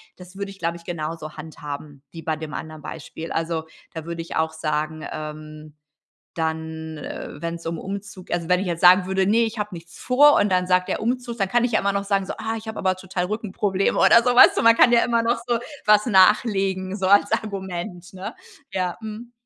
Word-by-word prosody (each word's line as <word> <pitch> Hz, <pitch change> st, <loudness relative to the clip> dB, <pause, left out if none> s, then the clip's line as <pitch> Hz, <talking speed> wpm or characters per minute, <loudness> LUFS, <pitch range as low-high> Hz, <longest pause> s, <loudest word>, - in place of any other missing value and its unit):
das 180 Hz, +1 st, -14 dB
würde 200 Hz, 0 st, -4 dB
ich, 195 Hz, -, -15 dB
glaube 170 Hz, -1 st, -2 dB
ich, 170 Hz, -, -18 dB
genauso 155 Hz, -2 st, -5 dB
handhaben 150 Hz, -2 st, -8 dB
wie 165 Hz, -, -9 dB
bei 160 Hz, 0 st, -2 dB
dem 155 Hz, -1 st, -7 dB
anderen 155 Hz, -1 st, -7 dB
Beispiel. 160 Hz, +1 st, -7 dB
Also, 165 Hz, -1 st, -2 dB, 0.3 s
da 160 Hz, -1 st, -7 dB
würde 170 Hz, 0 st, -5 dB
ich 165 Hz, -, -6 dB
auch 160 Hz, 0 st, 0 dB
sagen, 155 Hz, 0 st, -3 dB
ähm, 155 Hz, 0 st, -8 dB, 0.6 s
dann, 160 Hz, -1 st, -4 dB
äh, 150 Hz, -, -7 dB
wenn's 170 Hz, 0 st, -5 dB
um 165 Hz, 0 st, -2 dB
Umzug 195 Hz, -1 st, -7 dB
also, 170 Hz, -1 st, -2 dB
wenn 180 Hz, 0 st, +3 dB
ich 195 Hz, -, -3 dB
jetzt 170 Hz, -2 st, -3 dB
sagen 180 Hz, +1 st, +7 dB
würde: 190 Hz, 0 st, +1 dB
„Ne, 215 Hz, +3 st, +3 dB
ich 225 Hz, +1 st, -6 dB
habe 210 Hz, 0 st, -3 dB
nichts 170 Hz, 0 st, -11 dB
vor“, 290 Hz, +4 st, +5 dB
und 205 Hz, -, +2 dB
dann 180 Hz, -1 st, +1 dB
sagt 180 Hz, 0 st, +2 dB
der: -, -, -2 dB
„Umzug“, 240 Hz, 0 st, -2 dB
dann 195 Hz, -2 st, 0 dB
kann 240 Hz, +4 st, +2 dB
ich 245 Hz, -, 0 dB
ja 215 Hz, -, +3 dB
immer 200 Hz, 0 st, 0 dB
noch 200 Hz, 0 st, -1 dB
sagen 195 Hz, -1 st, +1 dB
so: -, -, -5 dB
„Ah, 225 Hz, 0 st, -3 dB
ich 220 Hz, 0 st, -8 dB
habe 220 Hz, -, -5 dB
aber 185 Hz, 0 st, +1 dB
total 185 Hz, -1 st, -4 dB
Rückenprobleme“, 200 Hz, -1 st, -1 dB
oder 235 Hz, -, +6 dB
so, 245 Hz, -, +2 dB
weißt 245 Hz, -, +8 dB
du? -, -, +1 dB
Man 230 Hz, 0 st, +6 dB
kann 240 Hz, -, +6 dB
ja 235 Hz, -, +5 dB
immer 235 Hz, -1 st, +1 dB
noch 235 Hz, +1 st, +1 dB
so 240 Hz, -1 st, +1 dB, 0.3 s
was 210 Hz, +2 st, +5 dB
nachlegen, 195 Hz, -2 st, +3 dB
so 190 Hz, -2 st, -1 dB
als 200 Hz, +1 st, +4 dB
Argument, 190 Hz, -3 st, -4 dB
ne? 190 Hz, +1 st, -6 dB, 0.4 s
Ja, 180 Hz, -2 st, -2 dB
mhm. 220 Hz, +2 st, -8 dB
185 Hz, 220 wpm, -23 LUFS, 165-210 Hz, 0.6 s, weißt